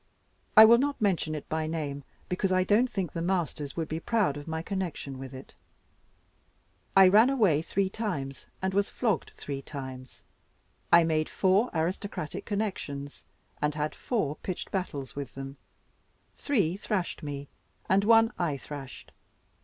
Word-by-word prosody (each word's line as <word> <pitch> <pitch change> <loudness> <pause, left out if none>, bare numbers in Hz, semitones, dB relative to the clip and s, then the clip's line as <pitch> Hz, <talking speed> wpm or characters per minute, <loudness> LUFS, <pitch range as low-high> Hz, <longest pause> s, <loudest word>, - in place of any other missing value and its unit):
I 220 - +13
will 235 +2 +7
not 285 0 0
mention 180 -7 +1
it 150 - -7
by 155 0 -1
name, 145 -3 -3 0.2
because 185 +1 -1
I 185 0 +3
don't 215 +6 +3
think 190 -8 -3
the 165 - -3
masters 165 -5 -1
would 165 -2 -1
be 160 - -3
proud 210 -7 +1
of 145 +1 -8
my 160 0 -3
connection 170 -8 -4
with 135 -1 -7
it. 130 0 -11 1.4
I 190 -1 +9
ran 215 +6 +6
away 205 - +3
three 195 +4 0
times, 180 - -4 0.2
and 190 0 0
was 200 +1 +2
flogged 220 -9 0
three 140 -1 -5
times. 130 -2 -8 0.7
I 170 0 +8
made 155 -1 +1
four 195 +5 +3
aristocratic 165 0 -3
connections, 170 -10 -4 0.4
and 150 0 +1
had 150 0 -1
four 160 - -2
pitched 185 - -5
battles 145 -9 -3
with 140 -3 -6
them: 135 0 -7 0.8
three 200 - +1
thrashed 200 -5 -2
me, 145 -2 -5 0.4
and 195 +1 +3
one 225 +1 +5
I 160 -5 0
thrashed. 135 -1 -9
170 Hz, 155 wpm, -29 LUFS, 145-200 Hz, 1.4 s, I